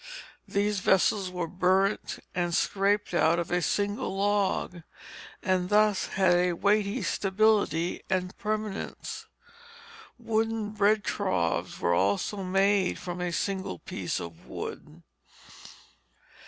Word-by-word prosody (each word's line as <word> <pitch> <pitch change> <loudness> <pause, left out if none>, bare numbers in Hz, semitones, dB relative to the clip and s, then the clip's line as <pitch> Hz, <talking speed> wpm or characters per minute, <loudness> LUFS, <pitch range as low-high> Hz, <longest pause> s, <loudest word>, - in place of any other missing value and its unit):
These 205 0 0
vessels 190 +1 +2
were 180 -1 -3
burnt 185 +3 +1 0.2
and 175 -1 0
scraped 200 0 +1
out 170 -1 +3
of 170 - -3
a 180 0 +2
single 205 +3 -1
log, 200 -3 0 0.6
and 185 -1 +1
thus 210 -1 +3
had 190 -2 +3
a 175 0 +2
weighty 200 +3 +1
stability 195 -4 +1
and 185 -1 -1
permanence. 215 -1 -4 0.9
Wooden 225 -2 -1
bread 210 0 +2
troughs 85 - -1
were 85 - +1
also 100 - +1
made 195 +1 +2
from 180 0 -6
a 180 -1 -1
single 190 - -2
piece - - -4
of 85 -1 -9
wood. - - -8
195 Hz, 115 wpm, -28 LUFS, 180-205 Hz, 0.9 s, out